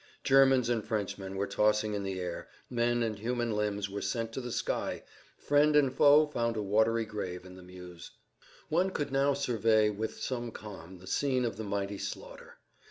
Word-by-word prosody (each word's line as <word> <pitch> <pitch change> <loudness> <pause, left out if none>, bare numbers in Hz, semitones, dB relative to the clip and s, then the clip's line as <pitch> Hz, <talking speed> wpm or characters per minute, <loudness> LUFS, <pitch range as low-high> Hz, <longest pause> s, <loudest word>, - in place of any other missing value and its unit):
Germans 135 -2 +5
and 120 -3 0
Frenchmen 100 -3 -3
were 100 +1 0
tossed 105 +1 +2
in 105 -1 -2
the 95 -1 -3
air, 90 -1 -5 0.2
men 120 0 +1
and 110 -3 -3
human 120 +1 -1
limbs 105 -1 -1
were 100 +1 -5
sent 115 -2 -2
to 130 - -3
the 125 -1 -6
sky, - - -2 0.3
friend 150 +1 +3
and 140 -3 +4
foe 145 +3 +6
found 115 -6 -2
a 105 - -1
watery 110 +3 +2
grave 95 -4 -5
in 90 0 -11
the 95 - -12
Meuse. 90 -1 -11 0.6
One 180 +4 +2
could 145 -7 -3
now 140 +1 +2
survey 110 -5 +2
with 110 +2 -4
some 120 -2 -3
calm 95 -5 -10
the 90 - -14
scene 130 +5 0
of 115 - -2
the 110 - -5
mighty 100 -1 -3
slaughter. - - -8
110 Hz, 185 wpm, -30 LUFS, 100-125 Hz, 0.6 s, foe